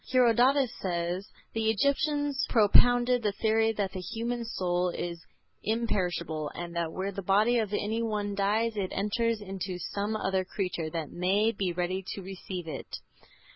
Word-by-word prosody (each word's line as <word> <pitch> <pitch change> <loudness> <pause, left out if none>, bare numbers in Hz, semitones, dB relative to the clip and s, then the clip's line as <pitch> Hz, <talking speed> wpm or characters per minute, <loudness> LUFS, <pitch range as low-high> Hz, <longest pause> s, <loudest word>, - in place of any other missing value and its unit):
Herodotus 255 +1 +4
says: 175 +1 -2 0.3
"The 225 -1 +1
Egyptians 280 +4 +1
propounded 245 +3 +5
the 210 -2 0
theory 220 +1 +2
that 200 -3 -1
the 190 - -5
human 235 +4 -3
soul 180 -4 0
is 170 -1 -4 0.4
imperishable, 180 -9 -1
and 170 0 -6
that 170 -1 -1
where 190 +3 -3
the 195 0 -5
body 210 +6 +3
of 215 -3 -1
any 215 +2 -1
one 210 -3 -1
dies 215 +3 +1
it 195 -3 -2
enters 225 +3 0
into 190 -2 -4
some 205 +4 -2
other 190 -3 0
creature 180 -4 -3
that 160 -2 -4
may 195 +5 +2
be 195 -4 -1
ready 180 +2 -2
to 195 - -7
receive 185 -2 -6
it." 160 - -5
200 Hz, 155 wpm, -29 LUFS, 180-225 Hz, 0.4 s, propounded